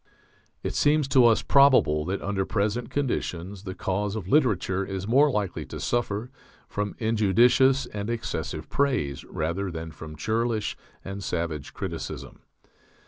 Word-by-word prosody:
It - - -2
seems 150 -1 +3
to 130 -2 +6
us 115 - +3
probable 130 - +5
that 95 +3 -3
under 100 -1 0
present 105 +4 -1
conditions 100 -8 -3
the 95 -1 -5
cause 100 +2 -2
of 100 -5 -5
literature 100 - +2
is 95 0 -5
more 140 +6 +5
likely 105 -8 -2
to - - -7
suffer 120 0 -1 0.4
from 105 0 -3
injudicious 120 +5 +4
and 105 +1 -5
excessive 115 -8 -3
praise 125 - 0
rather 85 +5 -2
than 80 -1 -6
from 75 0 -9
churlish 110 +5 -1 0.3
and 95 +1 -6
savage 85 -6 -3
criticism. - - -6
105 Hz, 140 wpm, -26 LUFS, 95-120 Hz, 0.4 s, to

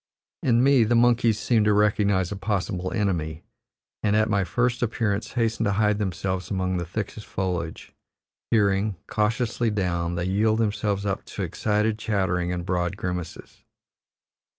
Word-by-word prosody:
In 120 -1 +3
me 135 -3 +5
the 115 +2 +2
monkeys 120 -2 +4
seem 115 -2 +2
to 105 0 +3
recognize 100 -3 +2
a - - -2
possible 95 -2 -2
enemy, 85 -8 -1 0.6
and 105 0 +2
at 110 0 +2
my 100 -2 +2
first 125 +5 0
appearance 110 -3 -1
hasten 115 -2 0
to 100 - +1
hide 105 0 +2
themselves 95 -2 -2
among 95 -2 -1
the 85 -1 -3
thickest 105 +3 -5
foliage; 90 -4 -4 0.6
peering; 100 -1 +2
cautiously 115 +2 0
down, 85 -4 -1
they 85 0 -2
yield 110 +4 +2
themselves 105 -2 0
up 100 -1 -2
to - - -5
excited 105 +1 0
chattering 95 -5 0
and 90 -1 -3
broad 90 +1 -1
grimaces. 90 -3 -6
105 Hz, 150 wpm, -25 LUFS, 95-110 Hz, 0.6 s, me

